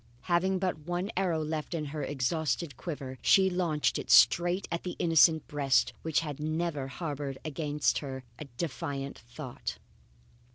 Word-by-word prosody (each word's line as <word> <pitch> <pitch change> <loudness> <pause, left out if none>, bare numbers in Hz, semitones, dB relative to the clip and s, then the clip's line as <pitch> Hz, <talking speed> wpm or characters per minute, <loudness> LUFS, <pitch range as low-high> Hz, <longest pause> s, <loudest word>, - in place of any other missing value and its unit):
Having 185 +2 +1
but 185 -3 -1
one 175 +6 -3
arrow 175 -4 +1
left 155 +2 -3
in 155 -2 -2
her 155 - -3
exhausted 145 +2 -1
quiver, 135 -4 -6
she 190 -1 +5
launched 170 -5 +1
it - - -7
straight 175 +3 +5
at 170 - -1
the 180 - -5
innocent 165 -1 +4
breast 135 -5 +2
which 160 -1 +1
had 150 -3 -5
never 155 -2 -2
harboured 145 -2 -4
against 150 -1 0
her 130 -2 -6 0.2
a 150 - -6
defiant 140 -3 -4
thought. 120 +3 -7
155 Hz, 150 wpm, -30 LUFS, 140-170 Hz, 0.2 s, she